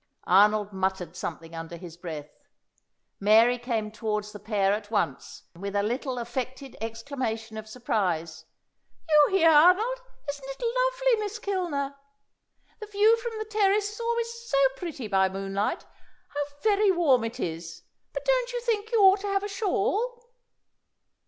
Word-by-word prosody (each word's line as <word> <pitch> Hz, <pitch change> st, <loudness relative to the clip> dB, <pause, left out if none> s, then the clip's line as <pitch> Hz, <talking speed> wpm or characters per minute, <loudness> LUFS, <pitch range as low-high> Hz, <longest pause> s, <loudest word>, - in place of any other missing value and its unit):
Arnold 210 Hz, +2 st, +4 dB
muttered 190 Hz, -3 st, -2 dB
something 165 Hz, -1 st, -6 dB
under 165 Hz, +1 st, -7 dB
his 170 Hz, -2 st, -10 dB
breath. 160 Hz, -4 st, -7 dB, 0.9 s
Mary 225 Hz, +4 st, +5 dB
came 225 Hz, -3 st, -2 dB
towards 210 Hz, -1 st, -3 dB
the 205 Hz, -, -9 dB
pair 200 Hz, -1 st, +1 dB
at 205 Hz, 0 st, -4 dB
once, 215 Hz, -2 st, -2 dB
with 200 Hz, +3 st, -5 dB
a 200 Hz, -, +2 dB
little 250 Hz, +4 st, -2 dB
affected 255 Hz, +2 st, -5 dB
exclamation 225 Hz, -1 st, -4 dB
of 220 Hz, 0 st, -7 dB
surprise. 175 Hz, -9 st, -2 dB, 0.6 s
"You 300 Hz, -2 st, +6 dB
here, 330 Hz, -2 st, +6 dB
Arnold! 370 Hz, +11 st, +5 dB, 0.3 s
Isn't 285 Hz, -1 st, -5 dB
it 270 Hz, -, -7 dB
lovely, -, -, +2 dB
Miss 415 Hz, +1 st, -4 dB
Kilner? 340 Hz, -10 st, -2 dB, 0.8 s
The 430 Hz, -, -7 dB
view 420 Hz, +2 st, +4 dB
from 460 Hz, -1 st, -5 dB
the 435 Hz, -, -4 dB
terrace 415 Hz, -1 st, +1 dB
is 430 Hz, -, -10 dB
always 465 Hz, 0 st, -1 dB, 0.2 s
so 275 Hz, -, +1 dB, 0.2 s
pretty 280 Hz, -7 st, -6 dB
by 190 Hz, -2 st, +3 dB
moonlight. 195 Hz, +1 st, -2 dB, 0.4 s
How 290 Hz, 0 st, -2 dB, 0.2 s
very 420 Hz, -1 st, +4 dB
warm 310 Hz, -10 st, +3 dB
it 230 Hz, 0 st, -5 dB
is! 165 Hz, 0 st, -5 dB, 0.3 s
But -, -, -5 dB
don't -, -, +1 dB
you 485 Hz, -, -2 dB
think 445 Hz, -2 st, -1 dB
you 455 Hz, -3 st, +3 dB
ought 385 Hz, 0 st, +7 dB
to 405 Hz, -, -5 dB
have 395 Hz, 0 st, +1 dB
a -, -, -2 dB
shawl?" 450 Hz, +4 st, -1 dB
260 Hz, 150 wpm, -27 LUFS, -, 0.9 s, ought